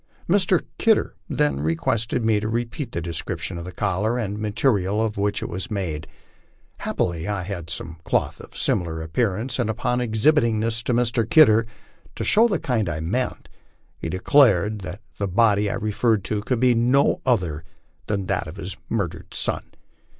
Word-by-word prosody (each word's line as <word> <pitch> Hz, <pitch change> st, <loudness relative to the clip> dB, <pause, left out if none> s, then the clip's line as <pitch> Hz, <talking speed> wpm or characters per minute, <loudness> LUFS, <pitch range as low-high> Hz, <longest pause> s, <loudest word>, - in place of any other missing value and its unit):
Mr. -, -, +3 dB
Kidder -, -, +3 dB, 0.2 s
then 70 Hz, -2 st, +1 dB
requested 95 Hz, +10 st, 0 dB
me 110 Hz, -2 st, +3 dB
to 105 Hz, +1 st, -3 dB
repeat 120 Hz, +3 st, -3 dB
the 85 Hz, -, -3 dB
description 85 Hz, 0 st, -4 dB
of 85 Hz, -, -7 dB
the 90 Hz, -, -6 dB
collar 105 Hz, +5 st, 0 dB
and 105 Hz, -3 st, -3 dB
material 105 Hz, -2 st, +1 dB
of 110 Hz, -1 st, 0 dB
which 100 Hz, +1 st, 0 dB
it -, -, -3 dB
was 95 Hz, +7 st, -5 dB
made; 90 Hz, -8 st, -3 dB, 0.7 s
happily 85 Hz, 0 st, -2 dB
I 100 Hz, -3 st, -2 dB
had 85 Hz, -4 st, -6 dB
some 80 Hz, 0 st, -5 dB
cloth -, -, 0 dB
of -, -, -12 dB
very -, -, -9 dB
similar 80 Hz, -2 st, 0 dB
appearance, 110 Hz, +9 st, -1 dB
and 120 Hz, -3 st, +1 dB
upon 125 Hz, +3 st, 0 dB
ex 110 Hz, -3 st, -2 dB
hibiting 120 Hz, -8 st, +4 dB
this 115 Hz, +1 st, -1 dB
to 125 Hz, -, +1 dB
Mr. 115 Hz, -2 st, +1 dB
Kidder, 115 Hz, -9 st, +6 dB, 0.5 s
to -, -, -3 dB
show 225 Hz, +3 st, +5 dB
the 200 Hz, -6 st, 0 dB
kind 115 Hz, -, -1 dB
I 75 Hz, -1 st, -3 dB
meant, 110 Hz, +11 st, -2 dB, 0.5 s
he 80 Hz, -, -4 dB
declared 105 Hz, -, +3 dB
that 95 Hz, +2 st, -7 dB, 0.2 s
the 100 Hz, -, 0 dB
body 105 Hz, +1 st, +3 dB
I -, -, -2 dB
referred 110 Hz, 0 st, +1 dB
to 105 Hz, 0 st, -2 dB
could 120 Hz, +3 st, -1 dB
be 125 Hz, 0 st, +4 dB
no 125 Hz, +4 st, +3 dB
other 90 Hz, -, 0 dB, 0.4 s
than 100 Hz, -2 st, -1 dB
that 95 Hz, -3 st, -1 dB
of 80 Hz, -, -8 dB
his 95 Hz, 0 st, -5 dB
murdered 90 Hz, -7 st, -3 dB
son. -, -, 0 dB
105 Hz, 180 wpm, -23 LUFS, 90-115 Hz, 0.7 s, Kidder